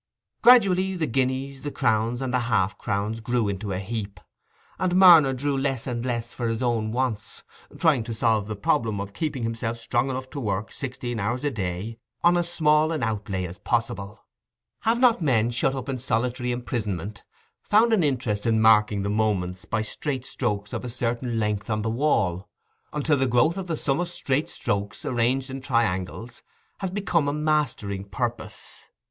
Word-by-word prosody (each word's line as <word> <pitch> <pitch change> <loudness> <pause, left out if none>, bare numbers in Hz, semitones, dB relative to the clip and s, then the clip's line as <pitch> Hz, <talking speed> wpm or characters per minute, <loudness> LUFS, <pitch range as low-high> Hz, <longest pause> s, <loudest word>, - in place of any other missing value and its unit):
Gradually 190 -6 +5
the 165 -3 0
guineas, 130 +1 -1
the 145 - -3
crowns, 120 -1 0
and 130 -1 -3
the 125 - +3
half 95 -3 +2
crowns 105 +3 -2
grew 115 -3 0
to 100 +1 -5
a 90 - -1
heap, 100 -1 -5 0.6
and 185 -1 +1
Marner 170 -7 +8
drew 140 +2 -1
less 135 -3 -1
and 120 -3 -3
less 120 -2 -2
for 120 - -2
his 115 +2 -1
own 115 -3 0
wants, 120 -3 -2 0.3
trying 150 -8 +3
to 115 - -4
solve 110 -2 +1
the 110 - -4
problem 105 +1 0
of 100 0 -5
keeping 150 -4 -3
himself 115 0 -2
strong 120 +3 0
enough 130 0 -4
to 145 - -5
work 105 -3 -2
sixteen 125 -3 -4
hours 120 +6 -1
a 145 - 0
day 100 +2 -4 0.2
on 175 +1 +5
as 175 0 +1
small 155 -1 +3
an 155 -5 -2
outlay 100 -4 -2
as 90 +2 -8
possible. 115 -4 -2 0.5
Have 230 +2 +1
not 245 -6 +4
men, 120 -6 +2
shut 130 +3 +1
up 130 -1 -5
in 135 -2 -3
solitary 125 +1 -1
imprisonment, 105 -5 -4 0.4
found 225 +2 +4
an 200 -6 +3
interest 125 -7 -1
in 110 -1 +3
marking 105 -2 +4
the 100 - -1
moments 95 -4 -1
by 110 -1 -1
straight 130 +3 -3
strokes 105 -6 -3
of - - -3
a 125 - -4
certain 120 0 -2
length 105 0 -1
on 110 -1 0
the 110 - -1
wall, 110 - 0 0.4
until 150 0 +1
the 135 0 +1
growth 125 +8 +3
of 190 -2 -5
the 165 -2 -2
sum 135 +1 0
of 175 0 -1
straight 140 -3 -1
strokes, 100 0 -3
arranged 130 +2 0
in 135 0 -5
triangles, 115 -3 -1 0.4
has 190 - -2
become 180 -6 0
a - - +1
mastering 145 -10 -1
purpose? 110 +1 -5
120 Hz, 180 wpm, -25 LUFS, 110-140 Hz, 0.6 s, Marner